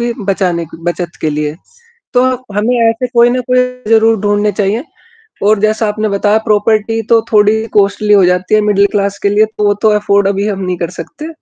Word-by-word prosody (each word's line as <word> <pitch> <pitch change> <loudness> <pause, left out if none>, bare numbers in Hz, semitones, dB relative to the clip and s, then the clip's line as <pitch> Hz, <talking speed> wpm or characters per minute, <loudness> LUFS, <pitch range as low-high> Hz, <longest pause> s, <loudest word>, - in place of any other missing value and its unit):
की 235 0 -1
बचाने 185 -3 -1
क 160 - -13
बचत 175 0 -4
के 155 - -1
लिए। 150 0 -3 0.6
तो 245 - +4 0.3
हमें 225 +4 0
ऐसे 230 +3 -1
कोई 235 +1 +5
न 255 +1 -1
कोई 255 - +3 0.3
ज़रूर 225 0 +4
ढूँढने 205 0 0
चाहिए, 205 - -1 0.6
और 210 0 +3
जैसा 215 +1 0
आपने 215 +1 -2
बताया, 205 +2 +1
प्रॉपर्टी 215 +1 +1
तो 230 -1 +4
थोड़ी 215 +1 +3
कॉस्ट्ली 205 +1 +2
हो 195 -3 +5
जाती 180 +3 +1
है 215 - +3
मिडल 205 -1 +2
क्लास 200 -1 -1
के 200 - +2
लिए, 210 +2 +3
तो 215 -1 -6
वो 205 - +3
तो 220 - +5
अफ़ॉर्ड 200 -1 +1
अभी 200 +1 -1
हम 200 -2 -3
नहीं 180 -1 -3
कर 170 -1 -3
सकते। 305 +1 -10
210 Hz, 205 wpm, -13 LUFS, 195-220 Hz, 0.6 s, कोई